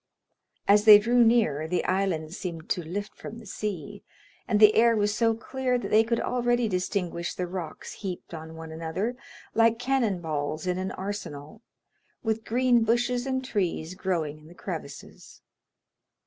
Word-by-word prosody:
As 205 +1 +5
they 210 -1 +11
drew 240 +3 +4
near 215 -11 +3
the 180 +2 -1
island 180 -4 0
seemed 170 -4 -6
to 180 - +1
lift 200 +5 -5
from 230 - -9
the 230 - -12
sea, 195 -6 -5 0.5
and 210 -3 +2
the 215 0 +8
air 230 0 +5
was 205 -1 +1
so 225 +1 +2
clear 255 +2 -1
that 245 - -5
they 220 +1 +6
could 230 +1 0
already 240 -1 +1
distinguish 180 -3 -2
the 180 - -2
rocks 175 -3 -6
heaped 185 -3 -7
on 160 0 -8
one 160 0 -8
another, 165 +9 -3 0.4
like 230 0 +4
cannon 245 -6 0
balls 155 0 -3
in 180 0 -1
an 190 0 -2
arsenal, 185 -7 -6 0.6
with 220 -1 -1
green 245 0 +3
bushes 240 +3 +1
and 260 -1 -1
trees 185 -8 -2
growing 165 -6 -2
in 155 - -17
the 175 - -15
crevices. 160 -8 -8
200 Hz, 160 wpm, -27 LUFS, 170-230 Hz, 0.6 s, they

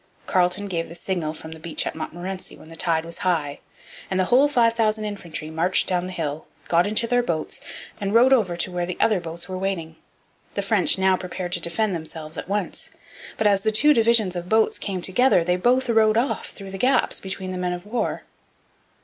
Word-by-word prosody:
Carleton 180 +2 +1
gave 170 -4 -3
the 170 - -9
signal 175 -3 -2
from 160 +1 -10
the 160 - -9
beach 160 0 -2
at - - -2
Montmorency 180 +4 -6
when 155 - -15
the 165 - -10
tide 165 0 +1
was 170 0 -4
high; 155 -6 0 0.5
and 190 - 0
the 185 - +3
whole 255 +8 +5
five 235 -5 +3
thousand 215 -2 +1
infantry 170 -6 -5
marched 165 +4 +1
down 180 -1 0
the - - -6
hill, 155 -4 -4 0.2
got 170 +3 +4
into 215 +2 0
their 245 +1 +2
boats, 165 -10 -3 0.4
and 200 -1 -2
rowed 245 +4 +6
over 190 -9 +2
to 180 - -2
where 175 -1 -2
the 180 - -4
other 215 -4 +3
boats 170 0 -6
were 185 -1 -4
waiting. 175 -4 -3 0.6
The 200 - -1
French 195 -2 +2
now 190 0 +3
prepared 180 -1 -5
to 175 - 0
defend 195 +5 0
themselves 160 -1 -6
at - - -6
once. 205 -1 -3 0.5
But 220 - -1
as 200 -2 +4
the 220 - +1
two 295 +8 +5
divisions 225 -6 +3
of 175 0 -5
boats 220 0 +2
came 190 -3 -4
together, 195 0 +4
they 180 +1 +1
both 250 +8 +2
rowed 220 -2 +4
off 245 +4 0
through 195 -1 -9
the 195 - -6
gaps 260 +3 +2
between 190 -1 -5
the 185 - -4
men 180 0 -1
of 175 +1 -7
war. 235 +4 -2
185 Hz, 215 wpm, -23 LUFS, 170-215 Hz, 0.6 s, rowed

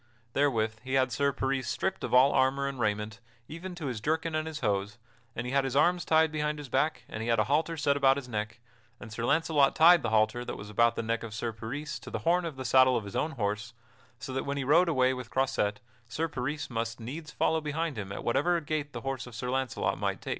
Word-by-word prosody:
Therewith 110 -6 +1
he 130 0 -2
had 130 -1 +2
Sir 140 +5 +1
Peris 135 -2 -2
stripped 190 0 -2
of - - -3
all 130 +3 +6
armor 135 +1 +2
and 135 -2 -5
raiment, 105 0 -1 0.3
even 175 +3 -7
to 170 -4 -6
his 125 -6 -3
jerkin 160 +4 -1
and 155 0 -1
his 155 -2 -6
hose, 100 -1 -1 0.4
and 120 - -3
he 125 - -4
had 140 0 +3
his 135 -1 -3
arms 175 +5 +3
tied 160 -1 +4
behind 150 -1 -1
his 145 -3 -8
back, 150 +6 0
and 110 - -6
he 115 - -3
had 115 - +3
a 110 - +4
halter 155 +6 0
set 145 -2 +2
about 135 -1 +4
his 135 -3 -6
neck; 110 0 -4 0.4
and 110 - -10
Sir 115 - -4
Launcelot 150 -1 +3
tied 170 +1 +7
the - - -1
halter 110 +2 +2
that - - -6
was 105 +1 -9
about 115 +2 +3
the - - -2
neck 115 0 -1
of 110 -2 -7
Sir 115 +1 -3
Peris 125 +7 -5
to - - -10
the - - -5
horn 175 +1 +3
of 160 -4 -5
the 130 0 -6
saddle 130 0 +5
of 110 - -4
his 100 - -8
own 160 0 -1
horse, 105 -1 -3 0.4
so 130 - -7
that 130 - -1
when 140 0 -3
he 140 - -1
rode 165 +6 +4
away 130 -4 +3
with 125 -2 -7
Croisette 120 -6 0 0.3
Sir 160 +8 -2
Peris 145 +1 -3
must 115 0 -3
needs 145 +7 -7
follow 160 +1 +1
behind 155 0 -2
him 100 -3 -5
at - - -6
whatever 170 +8 +2
gait 150 -2 -3
the - - -5
horse 135 -2 -4
of 120 - -11
Sir 125 +2 -3
Launcelot 130 -1 -1
might - - -1
take. - - -8
135 Hz, 250 wpm, -29 LUFS, 115-150 Hz, 0.4 s, tied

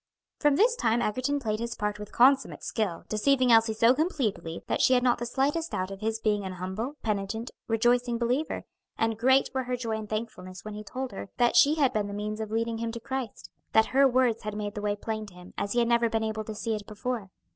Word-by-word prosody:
From 295 -2 +4
this 470 - +4
time 230 - +1
Egerton 255 +6 0
played 215 -5 -2
his 235 0 -3
part 210 0 -2
with 210 0 -8
consummate 265 +1 +3
skill, 195 -7 -2
deceiving 255 +3 +2
Elsie 225 -1 +5
so 230 +2 +5
completely 255 - -2
that - - -1
she 255 - +5
had 245 - +2
not 245 -2 +3
the 240 - -3
slightest 290 +7 0
doubt 185 +1 -2
of 195 - -7
his 220 +1 -1
being 210 -2 +1
an 190 -1 -5
humble, 190 +10 -4
penitent, 215 +2 -2 0.2
rejoicing 240 +1 +2
believer; 250 +6 -1 0.3
and 225 0 +1
great 265 +3 +4
were 260 -1 -1
her 250 0 -2
joy 225 -3 -2
and 210 -1 -8
thankfulness 205 -4 -5
when 215 - -6
he 210 0 -7
told 255 +4 -5
her 195 0 -7
that 240 -1 +3
she 280 +5 +6
had 280 -5 +2
been 210 -1 0
the 200 - -6
means 210 +1 -4
of 220 -1 -4
leading 225 +1 -1
him 230 0 -2
to 235 - -5
Christ; 260 -1 -5 0.2
that 220 - +6
her 275 +1 +6
words 250 -3 +2
had 210 0 -5
made 205 -1 -3
the 210 - -5
way 205 0 0
plain 215 +1 -4
to 185 - -14
him, 180 0 -13
as 200 - -2
he - - -2
had 235 -1 +3
never 235 0 +3
been 225 0 0
able 220 0 -3
to 220 - -6
see 225 +1 -2
it 210 -2 -5
before. 215 -1 -4
225 Hz, 245 wpm, -28 LUFS, 210-250 Hz, 0.3 s, she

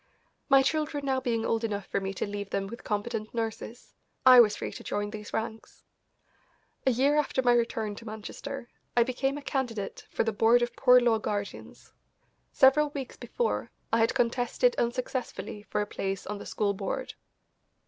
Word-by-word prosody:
My 270 -1 +7
children 300 -1 -1
now 265 -1 +1
being 230 -3 -1
old 225 0 0
enough 205 -3 -2
for - - -1
me 195 0 -3
to - - -1
leave 205 -1 -5
them 195 - -1
with 235 +4 -9
competent 215 +1 -3
nurses, 225 +1 -5 0.3
I 255 -1 +10
was 210 -3 +6
free - - -5
to - - -9
join 205 0 -2
these 210 -1 -8
ranks. 220 0 -5 1.0
A - - +8
year 270 +4 +3
after 270 -3 0
my 245 -1 +5
return 230 -3 0
to 230 - -10
Manchester 240 +5 -7 0.3
I 240 - +7
became 270 +3 -1
a 290 - -8
candidate 240 -8 -3
for - - 0
the 225 -1 -1
Board 230 +3 +4
of 240 0 -3
Poor 250 -1 +6
Law 235 -2 +3
Guardians. 205 -1 -5 0.6
Several 285 +3 +5
weeks 280 -3 -6
before, 480 - -2 0.2
I 230 - +4
had 225 - +2
contested 245 - +2
unsuccessfully 240 -3 -3
for - - 0
a - - 0
place 195 -2 -4
on 205 0 -5
the - - -8
school 205 -2 0
board. 195 0 -4
230 Hz, 180 wpm, -28 LUFS, 210-260 Hz, 1.0 s, I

